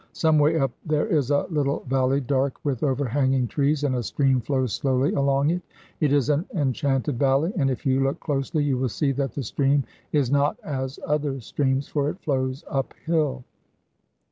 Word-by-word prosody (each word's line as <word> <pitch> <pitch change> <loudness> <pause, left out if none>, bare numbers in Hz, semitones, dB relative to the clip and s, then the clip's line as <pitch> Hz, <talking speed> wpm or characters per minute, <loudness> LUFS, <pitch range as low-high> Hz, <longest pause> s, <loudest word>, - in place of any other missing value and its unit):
Some 160 -2 +3
way 150 +3 +3
up 135 -4 +1
there 155 -2 +1
is 155 - +1
a 145 -1 +2
little 145 -3 0
valley 135 +1 +1
dark 135 0 0
with 135 -5 -1
overhanging 135 -2 +1
trees, 145 +3 0
and 140 -3 +1
a 125 - 0
stream 135 +2 +1
flows 130 -3 -1
slowly 135 +1 +1
along 140 +1 +2
it. 180 +1 -1 0.4
It 150 -4 +2
is 140 -3 +3
an 150 +3 +1
enchanted 135 - 0
valley, 140 +7 +2
and 140 -7 +2
if 130 +4 -4
you 135 -1 +2
look 135 +1 0
closely 145 +1 -1
you 135 -3 0
will 130 -1 0
see 140 +5 0
that 135 0 -2
the 140 - -3
stream 140 +3 +1 0.3
is 140 -4 +1
not 145 +1 +2
as 130 -2 -4
other 145 -2 -1
streams, 135 +3 -1
for 145 -1 0
it 180 - -6
flows 130 -1 -2
uphill. 140 -1 -1
140 Hz, 185 wpm, -24 LUFS, 130-145 Hz, 0.4 s, Some